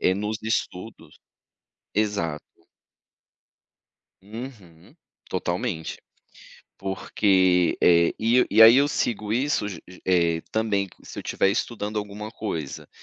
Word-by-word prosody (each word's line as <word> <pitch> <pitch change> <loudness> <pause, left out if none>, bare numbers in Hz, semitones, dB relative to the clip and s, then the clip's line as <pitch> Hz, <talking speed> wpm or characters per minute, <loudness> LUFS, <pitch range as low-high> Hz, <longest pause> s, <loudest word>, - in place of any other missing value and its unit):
eh, 95 - +3
nos 105 +2 -3
estudos. 110 -1 -4 0.8
Exato. 100 -8 -1 1.8
Uhum. 105 -6 -11 0.3
Totalmente. 90 -2 -3 0.8
Porque, 95 -2 +2
eh, 85 -1 +5
e 120 +3 +3
e 110 +2 +6
aí 115 +2 +9
eu 140 +1 +5
sigo 110 -7 -2
isso, 130 -3 0
ge 90 -5 -8
ge 90 - -14
eh, 85 -3 +2
também 105 -3 0
se - - -10
eu - - -5
tiver 95 - +1
estudando 105 -1 -2
alguma 105 +1 -6
coisa. 80 -11 -5
105 Hz, 110 wpm, -24 LUFS, 90-110 Hz, 1.8 s, aí